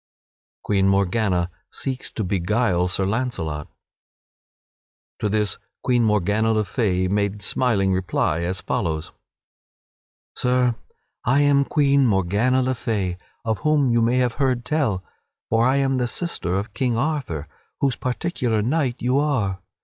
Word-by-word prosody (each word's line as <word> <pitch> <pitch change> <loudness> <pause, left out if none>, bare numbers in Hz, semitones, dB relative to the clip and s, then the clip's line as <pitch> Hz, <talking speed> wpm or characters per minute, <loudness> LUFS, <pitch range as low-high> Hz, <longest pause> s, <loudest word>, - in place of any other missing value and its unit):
[Sidenote: - - -94
Queen 95 -2 +2
Morgana 95 -2 +1 0.2
seeks 130 -1 -4
to 110 - -2
beguile 95 0 +1
Sir 95 +2 +2
Launcelot] 95 - -2 1.5
To 105 - 0
this 105 0 0 0.2
Queen 120 -2 +2
Morgana 105 +1 +2
le 110 -1 +1
Fay 95 -6 0
made 100 +1 -1
smiling 100 -5 +2
reply 90 -3 0
as 90 +2 -2
follows: 80 -1 -2 1.2
"Sir, 125 -1 +2 0.5
I 130 +4 +3
am 140 -1 +4
Queen 140 -3 +3
Morgana 105 +6 +2
le 130 +1 +1
Fay, 105 -7 -2 0.3
of 110 -1 0
whom 150 -4 +2
you 115 0 +3
may 120 +2 +2
have 125 -2 +2
heard 125 -3 +1
tell, 125 -10 0 0.5
for 115 +2 +4
I 130 - +3
am 135 -1 +1
the 125 -1 0
sister 120 - -2
of 100 +2 -3
King 125 -3 0
Arthur, 125 - -2 0.3
whose 135 -2 +1
particular 125 -5 -1
knight 130 0 0
you 125 +3 +2
are. 115 -11 0
115 Hz, 140 wpm, -23 LUFS, 95-130 Hz, 1.5 s, am